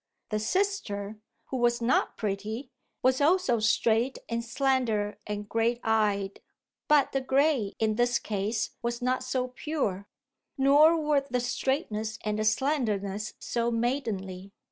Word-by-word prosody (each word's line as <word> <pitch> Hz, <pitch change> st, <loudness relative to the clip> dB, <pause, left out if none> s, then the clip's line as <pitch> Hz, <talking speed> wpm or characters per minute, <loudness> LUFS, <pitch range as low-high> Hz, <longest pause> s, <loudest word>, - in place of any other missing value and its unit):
The 215 Hz, -, 0 dB
sister, 215 Hz, -, -1 dB, 0.3 s
who 265 Hz, -, -2 dB
was 240 Hz, -1 st, +2 dB
not 240 Hz, +2 st, +1 dB
pretty, 215 Hz, +4 st, -3 dB, 0.3 s
was 255 Hz, +2 st, +3 dB
also 300 Hz, -6 st, +3 dB
straight 225 Hz, +3 st, +2 dB
and 230 Hz, 0 st, -2 dB
slender 235 Hz, -5 st, 0 dB
and 210 Hz, 0 st, -4 dB
grey 230 Hz, +2 st, +1 dB
eyed. 205 Hz, -3 st, +1 dB, 0.5 s
But 295 Hz, -2 st, +4 dB
the 270 Hz, -, 0 dB
grey 265 Hz, -5 st, +1 dB
in 215 Hz, -1 st, 0 dB
this 240 Hz, 0 st, +3 dB
case 210 Hz, +1 st, -2 dB
was 235 Hz, +1 st, -3 dB
not 255 Hz, +1 st, +1 dB
so 255 Hz, 0 st, -1 dB
pure, 250 Hz, -8 st, -3 dB, 0.5 s
nor 295 Hz, +5 st, +6 dB
were 300 Hz, -2 st, +2 dB
the 250 Hz, 0 st, 0 dB
straightness 240 Hz, -3 st, -2 dB
and 210 Hz, 0 st, -1 dB
the 215 Hz, -, 0 dB
slenderness 215 Hz, -5 st, 0 dB
so 235 Hz, 0 st, -1 dB
maidenly. 220 Hz, -6 st, -2 dB
235 Hz, 135 wpm, -28 LUFS, 210-265 Hz, 0.5 s, nor